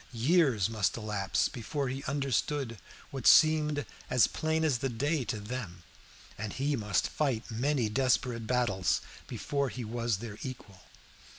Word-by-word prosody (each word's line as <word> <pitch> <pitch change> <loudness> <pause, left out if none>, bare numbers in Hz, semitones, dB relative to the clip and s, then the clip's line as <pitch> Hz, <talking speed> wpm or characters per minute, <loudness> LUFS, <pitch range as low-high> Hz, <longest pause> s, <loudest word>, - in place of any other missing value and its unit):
Years 125 - +3
must 110 -3 0
elapse 105 -4 0
before 135 +4 -3
he 135 +2 -4
understood 140 -3 -1 0.3
what 135 -3 -2
seemed 150 -2 +5 0.2
as 125 -2 +5
plain 160 0 -1
as 135 -6 +2
the 135 - -1
day 145 +5 0
to 110 -3 -3
them, 105 -5 -6 0.6
and 105 -1 -4
he 140 +2 0
must 105 -6 0
fight 130 -6 -1
many 125 +1 +1
desperate 125 -1 +1
battles 105 -7 +1 0.3
before 140 -2 -2
he 125 -2 -6
was 115 -1 -1
their 110 0 -8
equal. 110 -8 -8
125 Hz, 140 wpm, -30 LUFS, 110-140 Hz, 0.6 s, seemed